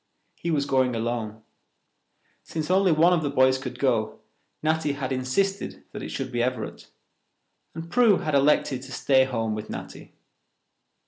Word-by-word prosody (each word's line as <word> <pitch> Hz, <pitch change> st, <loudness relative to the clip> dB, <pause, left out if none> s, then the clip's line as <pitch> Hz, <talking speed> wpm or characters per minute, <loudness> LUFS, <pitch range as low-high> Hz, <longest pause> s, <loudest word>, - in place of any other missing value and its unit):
He 170 Hz, -, -5 dB
was 145 Hz, -4 st, +1 dB
going 130 Hz, -3 st, +1 dB
alone. 110 Hz, -2 st, -3 dB, 1.0 s
Since 160 Hz, +1 st, -4 dB
only 190 Hz, -1 st, +4 dB
one 165 Hz, +3 st, +5 dB
of 170 Hz, -, +2 dB
the 145 Hz, -, -1 dB
boys 130 Hz, -1 st, +3 dB
could -, -, -6 dB
go, -, -, 0 dB, 0.5 s
Natty 155 Hz, -2 st, +1 dB
had 135 Hz, -2 st, -4 dB
insisted 135 Hz, +11 st, -1 dB
that -, -, -7 dB
it -, -, -6 dB
should 130 Hz, -1 st, -4 dB
be 120 Hz, -1 st, -1 dB
Everett, 125 Hz, +1 st, -3 dB, 0.9 s
and 165 Hz, 0 st, -6 dB
Prue 220 Hz, 0 st, +4 dB
had 155 Hz, -4 st, -3 dB
elected 140 Hz, -2 st, +3 dB
to 135 Hz, +1 st, -11 dB
stay 130 Hz, 0 st, +3 dB
home 115 Hz, -4 st, -2 dB
with 105 Hz, 0 st, -6 dB
Natty. -, -, -8 dB
135 Hz, 155 wpm, -25 LUFS, 130-160 Hz, 1.0 s, one